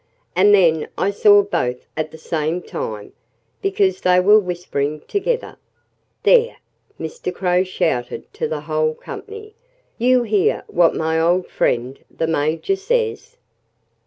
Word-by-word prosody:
"And 200 +3 +5
then 170 -6 +4
I 195 - +1
saw 205 0 +5
both 125 -10 -2
at 155 0 -2
the 160 - -12
same 160 +2 -2
time, 105 -2 -6 0.5
because 395 0 +1
they 180 0 +4
were 205 +4 +6
whispering 160 -6 -3
together." 465 - -3 0.7
"There!" 475 -1 +4 0.4
Mr. 485 0 -5
Crow 180 -1 +1
shouted 125 -9 -2
to - - -2
the 155 -2 -4
whole 155 0 -1
company. 430 0 -10 0.5
"You 250 +1 +3
hear 210 -4 +1
what 170 -1 +2
my 160 0 0
old 175 +3 +2
friend 125 +3 -1
the - - -3
Major 160 - 0
says?" 470 +2 -2
180 Hz, 130 wpm, -20 LUFS, 155-255 Hz, 0.7 s, were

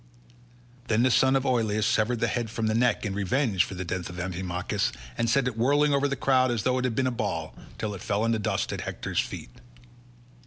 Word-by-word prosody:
Then 115 +1 +2
the 130 - +4
son 130 +2 +4
of 135 0 +1
Oileus 110 -4 +1
severed 115 +2 +1
the 115 - +3
head 120 0 -2
from 115 0 -2
the 110 - +1
neck 120 0 +2
in 100 - -2
revenge 100 +1 +1
for 95 - -7
the 90 0 -4
death 90 +1 -3
of 90 0 -8
Amphimachus, 90 0 -2 0.2
and 115 - 0
sent 135 +2 +2
it 125 - -2
whirling 145 +5 +3
over 140 0 +2
the 140 - -1
crowd 130 -1 +3
as 120 -4 -1
though 130 0 +2
it 130 - -1
had 120 -3 -1
been 130 - +1
a 130 - +1
ball, 100 -10 -3 0.2
till 105 -1 -3
it 95 - -8
fell 105 +1 0
in 115 - +2
the 110 - +1
dust 105 - -1
at - - -4
Hector's - - -3
feet. - - -4
115 Hz, 235 wpm, -27 LUFS, 100-130 Hz, 0.2 s, the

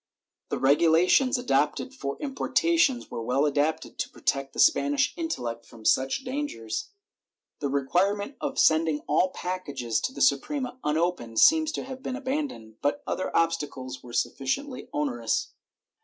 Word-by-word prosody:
The - - -1
regulations 165 - +4
adopted 245 - 0
for 140 - -4
importations 290 0 +1
were - - -4
well 130 +5 +1
adapted 150 +2 -1
to - - -1
protect 135 0 -2
the - - -7
Spanish 290 -2 +3
intellect 120 - -3
from 115 -2 -15
such 135 - +2
dangers. 290 - -4 0.7
The 140 - -1
require 175 +9 +2
ment 205 +7 -6
of 280 -2 -3
sending 160 -1 +3
all 185 - +2
packages 145 -12 -3
to - - -1
the - - -7
Suprema 265 -2 0
unopened 150 -7 -1
seems 315 -1 +6
to - - -3
have 260 0 -8
been 260 - -4
abandoned, 260 - -4
but 145 - 0
other 185 - -2
obstacles 145 -6 -1
were 125 - -12
sufficiently 255 - -2
onerous. 295 -3 -1
180 Hz, 140 wpm, -27 LUFS, -, 0.7 s, seems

